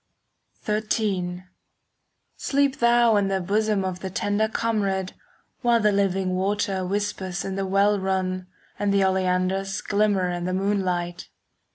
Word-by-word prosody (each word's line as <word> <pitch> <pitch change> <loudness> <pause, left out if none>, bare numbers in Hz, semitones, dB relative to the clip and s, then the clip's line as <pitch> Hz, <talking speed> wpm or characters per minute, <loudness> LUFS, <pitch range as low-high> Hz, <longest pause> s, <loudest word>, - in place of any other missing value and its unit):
XIII 205 -4 -1 0.9
Sleep 280 -1 0
thou 235 -2 +4
in 200 -1 +2
the 195 0 0
bosom 205 +1 0
Of 185 -1 -3
the 190 - -5
tender 205 +3 0
comrade, 200 -5 -1 0.5
While 240 -2 +3
the 210 -1 +3
living 195 -2 +1
water 195 0 0
Whispers 190 -2 -2
in 195 - -3
the 195 0 -2
well 200 +2 +3
run, 185 -1 -1 0.3
And 205 -1 +1
the 200 -1 +3
oleanders 190 +1 0
5 - - -17
Glimmer 200 -3 +2
in 175 0 -3
the 185 - -1
moonlight. 185 -3 -1
195 Hz, 140 wpm, -24 LUFS, 185-210 Hz, 0.9 s, thou